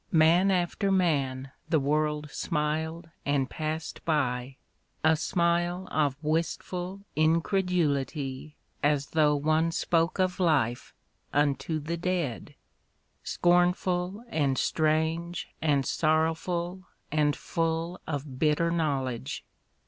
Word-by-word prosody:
Man 170 +4 +5
after 190 +2 +1
man 135 -8 +1 0.2
the 160 - +3
world 150 +1 0
smil'd 160 +1 -2
and 140 -2 +1
passed 155 +3 -4
by, 130 -4 -1 0.5
A 160 0 +5
smile 175 +2 0
of 145 -3 +1
wistful 175 +4 -2
incredulity 155 -4 0 0.3
As 145 -1 +1
though 150 -2 +4
one 155 +3 +2
spoke 165 0 +1
of 185 0 +1
life 140 -9 +1 0.4
unto 145 +2 +1
the 165 +3 -3
dead 170 -8 -2 0.3
— - - -45 0.3
Scornful, 180 +3 +1
and 140 - +1
strange, 160 +3 0
and 145 -4 +2
sorrowful, 170 +3 0 0.2
and 150 -1 +2
full 165 +2 -2
Of 140 -3 -4
bitter 160 +2 +2
knowledge. 140 -5 -2
160 Hz, 105 wpm, -28 LUFS, 145-175 Hz, 0.5 s, Man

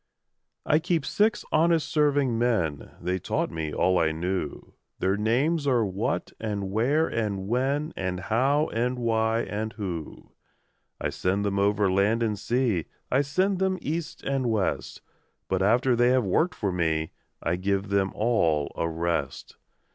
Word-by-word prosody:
I 150 - +4
Keep 165 -3 0
six 215 +2 +1
honest 165 0 +3
serving 145 -5 +2
men: 95 -12 0
(They 90 +2 -1
taught - - -1
me 80 -2 -3
all 95 +3 +2
I 80 -1 +2
knew) 85 -1 -4 0.2
Their 95 +1 +1
names 135 +9 +1
are 120 -5 +3
What 95 0 -2
and 100 -3 -3
Where 135 +10 +2
and 100 -4 -2
When 135 +7 0
And 90 -1 -3
How 135 - +2
and 125 +2 -1
Why 115 -1 +1
and 110 0 -4
Who. 90 -7 -6 0.7
I - - -1
send 95 +3 -1
them 100 -1 0
over 100 -1 +2
land 105 +5 +2
and 105 -3 -1
sea, 120 -9 0 0.3
I 135 - +4
send 185 +7 0
them 190 0 +1
east 160 +1 -4
and 135 -2 0
west; 110 -4 -1 0.4
But - - 0
after 120 +5 +3
they 120 +1 +4
have 125 -3 +3
worked 160 - +1
for 100 -4 -1
me, 80 -3 0 0.3
I 85 +2 +1
give 100 +2 -1
them 100 -1 +1
all 85 -10 +1
a 85 - -1
rest. 80 -4 -3
110 Hz, 155 wpm, -26 LUFS, 95-135 Hz, 0.7 s, I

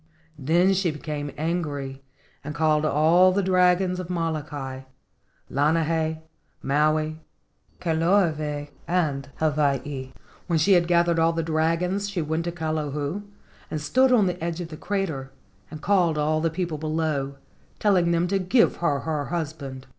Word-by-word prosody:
Then 170 +7 +3
she 190 -2 +1
became 150 -1 -4
angry 145 -5 -3 0.4
and 150 +1 -6
called 155 -1 +2
all 165 +5 +5
the 200 +2 +1
dragons 180 0 +3
of 180 -1 -6
Molokai, 150 -6 -3 0.7
Lanai, 160 +2 0 0.4
Maui, 155 +2 +1 0.6
Kahoolawe, 160 -4 +1 0.2
and 150 -6 0
Hawaii. 140 -3 -1 0.4
When 170 - +1
she 175 +6 +4
had 175 -2 +4
gathered 170 -1 +3
all 165 +1 +3
the 165 0 -1
dragons 165 +5 0
she 195 -3 -3
went 160 +2 -2
up 170 - -3
to - - -15
Kilauea 155 +2 -2 0.5
and 155 - -3
stood 255 - +3
on 225 -5 +5
the 180 -2 -2
edge 170 0 -2
of 170 -2 -5
the 155 - -7
crater 165 -10 -3 0.4
and 155 0 -9
called 180 -6 +2
all 155 +1 +1
the 165 - +1
people 165 -2 -3
below, 155 -3 -1 0.4
telling 185 -5 +3
them 170 +1 +2
to 195 0 +1
give 210 +6 +3
her 145 -5 0
the 150 -3 -2
husband. 145 -6 -5
160 Hz, 145 wpm, -25 LUFS, 150-175 Hz, 0.7 s, all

